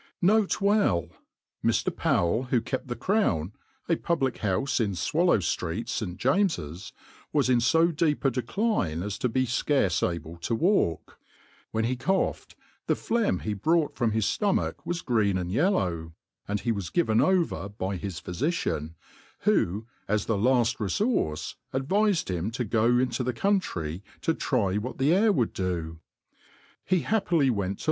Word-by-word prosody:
N. 180 - +6
B. 200 - -3
Mr, 195 - +1 0.8
PoweJ, 110 +10 +1
who 125 -1 +2
kept 130 +4 -4
the 120 - -3
Crown, 110 - 0 0.3
a 170 - +3
public 135 -7 -1
houfe 110 +8 0
in 100 -3 -2
Swallow 170 - +2
ilrect, 95 +3 -2
St. 90 -5 -3
James's, 130 - 0 0.4
was 140 -4 +2
in 125 - +4
fo 165 +8 +3
deep 150 -2 0
a 135 - +4
decline 125 - -1
as 100 0 -4
to 125 - 0
be 130 +3 +1
fcarcc 120 - +1
able 85 0 -9
to 85 +7 -2
walk; 170 - 0 0.5
whpn 110 0 0
he 125 +2 0
coughed, 185 +11 -1 0.3
the - - +3
phlegm 230 -2 0
he 105 - -1
brought, 155 - +1
from 120 - +1
his 110 -1 0
(lom^ch 205 - +1
was 175 0 -3
green 110 -6 +2
'anq 90 -1 -3
y^llpw; 95 - 0 0.3
ana 105 0 -1
he 120 - 0
was 100 -5 -3
given 135 -11 +2
ovpr 160 - +1
by 95 -1 -2
his 95 -1 -5
phyficiaot 90 - -2 0.5
who, 100 +6 +1 0.2
as 105 0 0
th^ 105 -3 0
laft 120 -2 +3
refqurce, 100 - -1 0.2
adv^fed 190 +7 +1
him 90 +2 -2
to 125 +2 -3
go 115 +3 +2
into 125 -1 0
the 125 0 -1
country 100 - -1 0.2
to - - +1
try 95 0 0
what 115 +5 -4
t^e 140 +3 +2
.air 210 +4 +4
would 125 - 0
do% 85 -3 -3 0.9
Hf^ 185 -3 +2
bapi 220 -1 +1
pily 150 -7 +3
went 100 -3 -2
to. - - -26
120 Hz, 160 wpm, -27 LUFS, -, 0.9 s, N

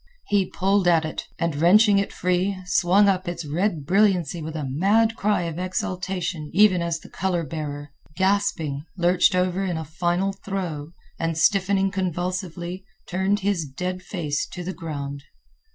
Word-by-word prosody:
He 200 -2 +2
pulled 195 0 +1
at 165 -2 +4
it 155 - -5
and, 170 -2 -1
wrenching 200 +6 +5
it 200 - -2
free, 180 +2 0
swung 180 +3 +4
up 190 -2 +1
its 170 -1 -4
red 160 0 -1
brilliancy 180 -3 +2
with 160 +1 -6
a 150 -3 -3
mad 205 +11 +2
cry 210 -4 +1
of 165 0 -4
exultation 185 -4 -3
even 195 -3 +5
as 170 -1 -1
the - - -14
color 180 -2 -1
bearer, 145 -2 -5 0.3
gasping, 190 -7 0
lurched 180 +1 +3
over 185 +1 +1
in 180 -4 -1
a 160 - -4
final 175 +5 0
throe 175 -6 -5 0.3
and, 165 -1 -1
stiffening 195 +2 +3
convulsively, 180 -1 -3 0.2
turned 190 +3 0
his 195 -4 0
dead 180 +7 -4
face 155 -7 -3
to 180 - -7
the 185 +2 -4
ground. 140 -5 -5
180 Hz, 155 wpm, -24 LUFS, 165-195 Hz, 0.3 s, wrenching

